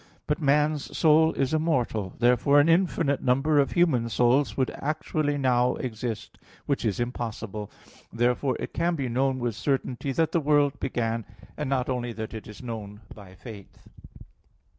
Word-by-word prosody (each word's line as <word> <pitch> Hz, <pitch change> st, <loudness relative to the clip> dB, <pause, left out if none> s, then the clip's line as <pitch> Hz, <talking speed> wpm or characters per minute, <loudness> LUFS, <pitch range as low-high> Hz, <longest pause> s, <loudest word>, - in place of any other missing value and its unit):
But 150 Hz, +3 st, -1 dB
man's 150 Hz, +1 st, +1 dB
soul 160 Hz, 0 st, +5 dB
is 135 Hz, +2 st, -1 dB
immortal: 125 Hz, -, 0 dB
therefore 125 Hz, +4 st, +4 dB
an 145 Hz, -, +4 dB
infinite 165 Hz, -4 st, +2 dB
number 135 Hz, +4 st, +2 dB
of 140 Hz, -, +1 dB
human 140 Hz, -10 st, +2 dB
souls 125 Hz, +5 st, +2 dB
would 130 Hz, -2 st, +1 dB
actually 150 Hz, 0 st, -2 dB
now 125 Hz, -2 st, +2 dB
exist, 115 Hz, -2 st, -5 dB, 0.3 s
which 140 Hz, -, -1 dB
is 105 Hz, -1 st, -1 dB
impossible. 115 Hz, -4 st, -4 dB, 0.4 s
Therefore 125 Hz, +2 st, 0 dB
it -, -, -6 dB
can 170 Hz, +1 st, 0 dB
be 135 Hz, -4 st, -2 dB
known 130 Hz, +2 st, 0 dB
with 120 Hz, -2 st, -2 dB
certainty 135 Hz, 0 st, -2 dB
that 160 Hz, +2 st, +1 dB
the 170 Hz, -, +2 dB
world 145 Hz, -1 st, +2 dB
began, 115 Hz, -3 st, -2 dB, 0.3 s
and 150 Hz, -3 st, -3 dB
not 130 Hz, -2 st, 0 dB
only 125 Hz, -2 st, -2 dB
is 115 Hz, -, -8 dB
it 110 Hz, 0 st, -7 dB
known 105 Hz, -3 st, -7 dB
by 95 Hz, -3 st, -13 dB
faith. 100 Hz, 0 st, -12 dB
130 Hz, 155 wpm, -26 LUFS, 115-145 Hz, 0.4 s, soul